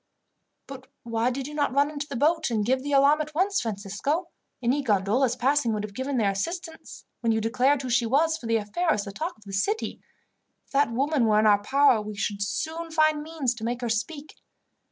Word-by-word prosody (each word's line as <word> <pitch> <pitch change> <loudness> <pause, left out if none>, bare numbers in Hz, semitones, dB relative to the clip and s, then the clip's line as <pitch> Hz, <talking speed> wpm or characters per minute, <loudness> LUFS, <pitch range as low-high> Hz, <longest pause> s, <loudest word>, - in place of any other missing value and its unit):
"But 265 -1 -10 0.2
why 230 0 0
did 260 +1 -4
you 300 - -8
not 290 -3 -1
run 285 +1 +3
into 290 -1 -5
the 280 - -6
boat 315 +4 +2
and 215 -3 0
give 260 +3 +1
the 290 +2 -4
alarm 285 +2 +5
at 305 0 -6
once, 390 +4 +1
Francisco? 225 - -3 0.3
Any 255 +4 +1
gondolas 230 +2 +1
passing 255 -1 +1
would 210 -1 -2
have 210 -1 -7
given 260 +4 -3
their 205 -4 +2
assistance, 325 - -6
when 230 - +1
you 220 - +1
declared 255 +5 +1
who 255 - -4
she 235 -1 +2
was, 315 +6 +2
for 240 - -8
the 230 0 +2
affair 270 +12 -1
is 205 - -2
the 200 - -7
talk 315 - -5
of 215 - -21
the 195 - -9
city. 410 - -1 0.6
If - - -34
that 280 -3 +2
woman 270 0 +1
were 210 -1 +3
in 215 - +3
our 205 -1 +5
power 270 0 +4
we 210 0 -7
should 205 0 -3
soon 320 +11 -3
find 310 -1 +2
means 300 -5 -2
to 235 -2 -10
make 240 +2 -2
her 240 - -2
speak." 285 +7 -3
260 Hz, 220 wpm, -26 LUFS, 220-300 Hz, 0.6 s, alarm